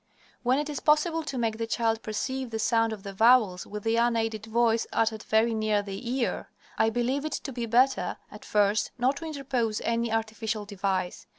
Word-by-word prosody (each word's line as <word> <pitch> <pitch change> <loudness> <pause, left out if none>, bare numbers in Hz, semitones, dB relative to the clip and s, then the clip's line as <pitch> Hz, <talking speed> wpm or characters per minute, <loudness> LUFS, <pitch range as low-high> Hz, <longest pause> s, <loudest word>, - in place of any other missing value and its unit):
When 255 +2 +2
it 295 +1 -1
is 295 -2 -4
possible 315 +2 +2
to 290 -4 -5
make 225 -2 -1
the 230 - -2
child 225 -1 0
perceive 260 +4 -3
the 225 - -3
sound 225 0 +2
of 210 -3 -7
the 200 -1 -7
vowels 220 -4 +4
with 210 0 -6
the 225 0 +1
unaided 225 -2 0
voice 230 0 +2
uttered 220 -1 0
very 225 +2 +2
near 215 -2 +1
the 200 +4 -6
ear, 240 - -2 0.3
I 220 - +3
believe 245 +5 -1
it 310 - -3
to 270 - -4
be 235 -1 -3
better, 255 +4 +2
at - - -11
first, 210 0 +2
not 255 +3 +1
to 325 - -6
interpose 260 -8 -2
any 230 0 0
artificial 220 -1 -2
device. 195 -3 -3
225 Hz, 195 wpm, -27 LUFS, 215-255 Hz, 0.3 s, vowels